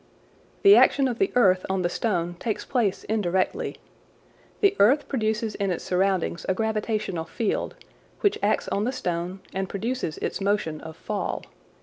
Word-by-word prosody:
The 400 0 +9
action 275 -1 +5
of 240 -1 -3
the 390 - +2
earth 185 -6 +4
on 190 -1 0
the - - +3
stone 175 -3 -1
takes 220 -3 -3
place 225 -7 0
indirectly. 190 -4 -1 0.8
The 400 -1 +4
earth 270 +8 +5
produces 220 -3 -1
in 200 -1 -1
its 175 - -2
surrounding 185 -2 0
a 190 - +2
gravitational 215 -5 -1
field, 215 +5 -2 0.5
which 410 - +2
acts 205 +1 +1
on 200 +2 0
the 250 - 0
stone 180 -5 -3
and 190 -1 -2
produces 220 -5 -3
its - - -3
motion 195 -6 0
of 160 0 -9
fall. 210 -2 -3
205 Hz, 155 wpm, -25 LUFS, 185-230 Hz, 0.8 s, The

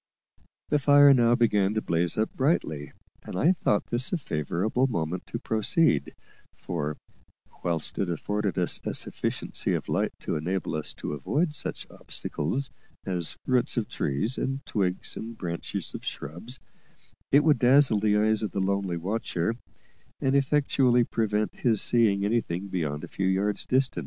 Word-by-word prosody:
The 150 - +3
fire 145 0 +7
now 120 -2 +4
began 105 -4 +2
to 110 - +1
blaze 85 -2 0
up 110 +1 0
brightly, 80 - 0 0.3
and - - -8
I 160 - +4
thought 105 - +1
this 120 +2 0
a 180 - +1
favourable 105 - -1
moment 85 -6 -3
to - - -4
proceed; 110 - +1 0.4
for, 75 -3 -4 0.7
whilst 85 -3 -1
it 95 - 0
afforded 105 +4 -2
us 90 -1 +1
a - - -3
sufficiency - - -1
of - - -4
light - - 0
to - - -2
enable 90 +4 -2
us 75 -1 -3
to - - -5
avoid 150 - 0
such 150 - -4
obstacles 125 - -3 0.3
as 90 -3 -1
roots 125 -2 +1
of 115 - 0
trees 105 - -1
and 135 +1 -3
twigs 95 -4 -2
and 115 +1 -7
branches 85 -2 -4
of - - -7
shrubs, 85 - -6 0.7
it 140 +2 +6
would 150 -5 +4
dazzle 130 -3 +5
the 105 0 +2
eyes 110 +1 +2
of 105 - -3
the 100 - -1
lonely 95 -2 0
watcher, 95 +1 -1 0.7
and 135 +1 +1
effectually 135 -3 +3
prevent 110 -2 -1
his 115 -4 +2
seeing 105 -4 +3
anything 100 -4 -1
beyond 75 -5 -2
a - - -5
few 95 - -2
yards 100 +2 0
distant. 130 +1 +1
105 Hz, 155 wpm, -27 LUFS, 90-125 Hz, 0.7 s, fire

